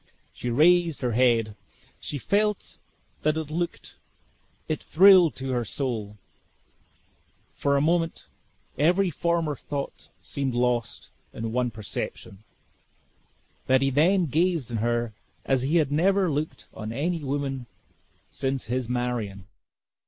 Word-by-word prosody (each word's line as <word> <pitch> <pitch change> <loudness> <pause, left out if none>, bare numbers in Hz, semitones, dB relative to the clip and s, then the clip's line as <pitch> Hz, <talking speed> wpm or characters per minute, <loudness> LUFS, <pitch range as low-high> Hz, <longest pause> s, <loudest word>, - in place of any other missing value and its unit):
She 120 - -4
raised 165 +5 +4
her 125 - +1
head 115 -3 +2 0.4
she 145 - -5
felt 200 - -1 0.4
that 155 0 +1
look 160 +2 -3 0.9
it 155 - -2
thrilled 185 -2 +6
to 130 0 -4
her 120 -2 0
soul. 110 -4 -3 1.4
For 140 0 +1
a - - +2
moment 165 +1 0 0.5
every 180 +5 +3
former 165 -1 0
thought 140 0 -6
seemed 135 -3 -3
lost 120 -1 -1 0.2
in 115 - -6
the 115 - -2
one 125 +2 0
perception, 105 -2 -6 1.3
that 130 +1 +4
he 135 - +2
then 175 +7 +3
gazed 160 -3 0
on 115 - -1
her 120 0 -1 0.3
as 135 -2 +2
he 140 +6 0
had 155 -5 +3
never 185 +3 +2
looked 150 +2 -3
on 110 0 -6
any 160 +6 -2
woman 135 -2 -3 0.6
since 135 -1 -2
his 125 0 -2
Marion. 120 -6 -2
135 Hz, 125 wpm, -26 LUFS, 120-165 Hz, 1.4 s, thrilled